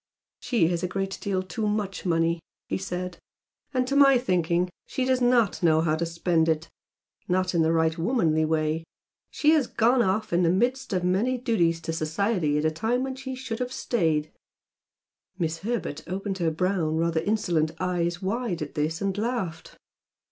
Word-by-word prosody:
"She 235 Hz, -9 st, +1 dB
has 170 Hz, -1 st, -1 dB
a 180 Hz, -, -1 dB
great 195 Hz, +1 st, -3 dB
deal 190 Hz, -2 st, -1 dB
too 200 Hz, +4 st, -3 dB
much 205 Hz, -3 st, -2 dB
money" 165 Hz, 0 st, +2 dB, 0.3 s
he -, -, -2 dB
said, 180 Hz, -2 st, -5 dB, 0.5 s
"and 255 Hz, -2 st, +1 dB
to 275 Hz, -, -1 dB
my 275 Hz, -2 st, +7 dB
thinking 180 Hz, -6 st, +1 dB, 0.2 s
she 260 Hz, -, -1 dB
does 260 Hz, -1 st, +1 dB
NOT 245 Hz, -4 st, +3 dB
know 160 Hz, -2 st, +4 dB
how 155 Hz, -1 st, +1 dB
to 165 Hz, +1 st, -2 dB
spend 165 Hz, -1 st, +1 dB
it, 160 Hz, +1 st, 0 dB, 0.6 s
not 185 Hz, 0 st, +1 dB
in 170 Hz, -, +3 dB
the 160 Hz, 0 st, +3 dB
right 160 Hz, -1 st, +2 dB
womanly 165 Hz, -6 st, +2 dB
way. 155 Hz, 0 st, 0 dB, 0.5 s
She 300 Hz, -, +3 dB
has 305 Hz, -6 st, +3 dB
gone 240 Hz, +3 st, +3 dB
off 215 Hz, -1 st, 0 dB
in 175 Hz, -, +3 dB
the 170 Hz, -, +3 dB
midst 250 Hz, +8 st, +1 dB
of 185 Hz, -2 st, 0 dB
many 205 Hz, +8 st, +1 dB
duties 175 Hz, -9 st, +1 dB
to 165 Hz, -, -3 dB
society 165 Hz, 0 st, 0 dB
at 150 Hz, -, 0 dB
a 155 Hz, -, +3 dB
time 225 Hz, +10 st, 0 dB
when 265 Hz, -1 st, -3 dB
she 265 Hz, 0 st, -6 dB
should 250 Hz, -3 st, -5 dB
have 250 Hz, 0 st, -2 dB
stayed 160 Hz, -12 st, 0 dB, 0.5 s
" 185 Hz, -, -55 dB
Miss 165 Hz, -2 st, -2 dB
Herbert 195 Hz, -7 st, -3 dB
opened 195 Hz, +2 st, -3 dB
her 170 Hz, -2 st, +2 dB
brown, 165 Hz, -1 st, 0 dB
rather 165 Hz, 0 st, +1 dB
insolent 175 Hz, -6 st, +1 dB
eyes 175 Hz, 0 st, -1 dB
wide 200 Hz, -4 st, -1 dB
at 145 Hz, -, -8 dB
this 155 Hz, +1 st, -1 dB
and 195 Hz, -1 st, 0 dB
laughed. 205 Hz, -7 st, -3 dB
180 Hz, 185 wpm, -26 LUFS, 165-225 Hz, 0.6 s, my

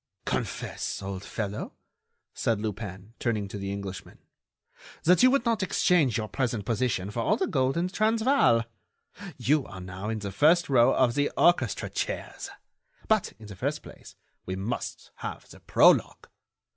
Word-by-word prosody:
"Confess, -, -, -3 dB
old 95 Hz, 0 st, -5 dB
fellow," 105 Hz, 0 st, -4 dB, 0.6 s
said 115 Hz, -3 st, 0 dB
Lupin, 105 Hz, -1 st, -6 dB
turning 110 Hz, -4 st, -1 dB
to 100 Hz, -, -6 dB
the 100 Hz, 0 st, -4 dB
Englishman, 100 Hz, -2 st, -7 dB, 0.9 s
"that 180 Hz, +6 st, +5 dB
you 255 Hz, -, +7 dB
would 275 Hz, -2 st, +2 dB
not 230 Hz, -2 st, +1 dB
exchange 170 Hz, -, +2 dB
your 110 Hz, -1 st, -2 dB
present 110 Hz, 0 st, -2 dB
position 110 Hz, -4 st, -1 dB
for 115 Hz, -, -4 dB
all 115 Hz, -, +2 dB
the -, -, 0 dB
gold 130 Hz, +2 st, 0 dB
in 170 Hz, -, +1 dB
the 185 Hz, -, -5 dB
Transvaal! 220 Hz, -, +3 dB, 0.7 s
You 150 Hz, +1 st, +2 dB
are 95 Hz, -, -9 dB
now 95 Hz, +3 st, -6 dB
in 110 Hz, -, -2 dB
the 100 Hz, -2 st, -5 dB
first 160 Hz, -, +4 dB
row 120 Hz, -3 st, +5 dB
of 125 Hz, -2 st, +3 dB
the 145 Hz, +2 st, +1 dB
orchestra 150 Hz, -, +3 dB
chairs! -, -, -4 dB, 0.6 s
But, -, -, +1 dB
in 110 Hz, -, -13 dB
the 105 Hz, -1 st, -9 dB
first 140 Hz, +10 st, -3 dB
place, -, -, -13 dB, 0.3 s
we 95 Hz, -, -4 dB
must 100 Hz, +6 st, -5 dB
have -, -, -7 dB
the -, -, -14 dB
prologue -, -, +3 dB
115 Hz, 160 wpm, -27 LUFS, 100-150 Hz, 0.9 s, you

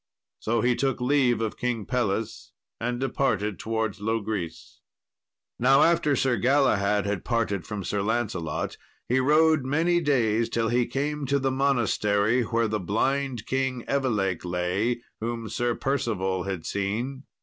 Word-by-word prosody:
So 115 Hz, +1 st, 0 dB
he 125 Hz, +1 st, +2 dB
took 135 Hz, +1 st, 0 dB
leave 125 Hz, -2 st, +2 dB
of 110 Hz, -2 st, -3 dB
King 120 Hz, -4 st, -1 dB
Pelles, 105 Hz, -4 st, -2 dB, 0.3 s
and 120 Hz, +1 st, -2 dB
departed 110 Hz, -7 st, 0 dB
towards 110 Hz, -2 st, -2 dB
Logris. 100 Hz, -3 st, -3 dB, 0.8 s
Now 135 Hz, +3 st, +5 dB
after 165 Hz, -4 st, +3 dB
Sir 130 Hz, -2 st, +1 dB
Galahad 105 Hz, -5 st, +2 dB
had 100 Hz, -1 st, -2 dB
parted 110 Hz, -6 st, -1 dB
from 105 Hz, -2 st, -4 dB
Sir 100 Hz, +2 st, -1 dB
Lancelot, 100 Hz, -7 st, -2 dB, 0.3 s
he 130 Hz, +2 st, +2 dB
rode 155 Hz, +2 st, +4 dB
many 165 Hz, +6 st, +2 dB
days, 115 Hz, -6 st, +2 dB
till 115 Hz, -1 st, 0 dB
he 120 Hz, +1 st, +2 dB
came 145 Hz, +3 st, -2 dB
to 140 Hz, +2 st, +2 dB
the 135 Hz, -1 st, 0 dB
monastery 120 Hz, -4 st, +2 dB
where 115 Hz, 0 st, 0 dB
the 110 Hz, 0 st, -1 dB
blind 125 Hz, +5 st, -1 dB
King 130 Hz, -2 st, -1 dB
Evelake 105 Hz, -10 st, 0 dB
lay, 90 Hz, +7 st, -1 dB, 0.2 s
whom 115 Hz, 0 st, -3 dB
Sir 120 Hz, +2 st, -1 dB
Percival 100 Hz, -9 st, -1 dB
had 95 Hz, -4 st, -4 dB
seen. 115 Hz, +8 st, -3 dB
115 Hz, 140 wpm, -26 LUFS, 105-130 Hz, 0.8 s, Now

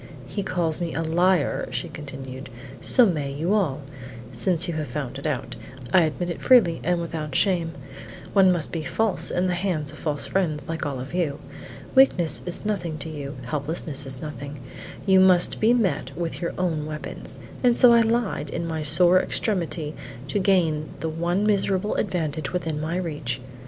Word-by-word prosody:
"He 145 Hz, +10 st, -4 dB
calls 175 Hz, -3 st, 0 dB
me 170 Hz, -1 st, -3 dB
a 165 Hz, -, -1 dB
liar," 175 Hz, 0 st, +1 dB
she 125 Hz, 0 st, -3 dB
continued; 135 Hz, -3 st, -8 dB, 0.3 s
"so 250 Hz, -, +5 dB
may 150 Hz, -8 st, -1 dB
you 160 Hz, +8 st, -1 dB
all. 155 Hz, -9 st, +1 dB, 0.5 s
Since 170 Hz, +9 st, +2 dB
you 170 Hz, -, -2 dB
have 155 Hz, -2 st, -3 dB
found 135 Hz, 0 st, -5 dB
it 140 Hz, -, -3 dB
out, 140 Hz, -5 st, -3 dB, 0.4 s
I 175 Hz, -3 st, +6 dB
admit 175 Hz, +3 st, -3 dB
it -, -, -6 dB
freely 210 Hz, -11 st, +5 dB
and 175 Hz, +1 st, +1 dB
without 155 Hz, -4 st, -4 dB
shame; 175 Hz, -5 st, +1 dB, 0.6 s
one 190 Hz, -2 st, +6 dB
must 170 Hz, -4 st, 0 dB
be 165 Hz, -, -3 dB
false 220 Hz, +5 st, 0 dB
in 180 Hz, -, 0 dB
the 180 Hz, -, +1 dB
hands 170 Hz, -5 st, 0 dB
of 155 Hz, -, -12 dB
false 150 Hz, -2 st, -2 dB
fiends 160 Hz, -7 st, -1 dB
like 160 Hz, -2 st, -3 dB
all 135 Hz, -3 st, -4 dB
of 130 Hz, +5 st, -7 dB
you. 165 Hz, -6 st, 0 dB, 0.6 s
Weakness 180 Hz, -, +5 dB
is 175 Hz, +4 st, +1 dB
nothing 175 Hz, -7 st, -2 dB
to 160 Hz, +2 st, -5 dB
you; 145 Hz, -3 st, -6 dB
helplessness 145 Hz, +1 st, -1 dB
is 130 Hz, +1 st, 0 dB
nothing; 145 Hz, -2 st, -7 dB, 0.4 s
you 190 Hz, -2 st, +5 dB
must 185 Hz, -2 st, +4 dB
be 220 Hz, +2 st, +4 dB
met 185 Hz, -, 0 dB
with 170 Hz, 0 st, -4 dB
your 170 Hz, -, -2 dB
own 160 Hz, -4 st, -1 dB
weapons, 155 Hz, 0 st, -4 dB, 0.3 s
and 245 Hz, -1 st, +4 dB
so 245 Hz, -2 st, +7 dB
I 235 Hz, -, +6 dB
lied 225 Hz, -9 st, 0 dB
in 170 Hz, -, -3 dB
my 160 Hz, -1 st, -3 dB
sore 175 Hz, +5 st, +5 dB
extremity 170 Hz, -9 st, -2 dB, 0.3 s
to 205 Hz, -, 0 dB
gain 170 Hz, -6 st, +2 dB
the 160 Hz, -, -2 dB
one 175 Hz, +5 st, 0 dB
miserable 200 Hz, -1 st, +1 dB
advantage 155 Hz, -4 st, -2 dB
within 160 Hz, -4 st, -2 dB
my 165 Hz, +3 st, -2 dB
reach. 150 Hz, -8 st, -3 dB
165 Hz, 180 wpm, -24 LUFS, 150-185 Hz, 0.6 s, so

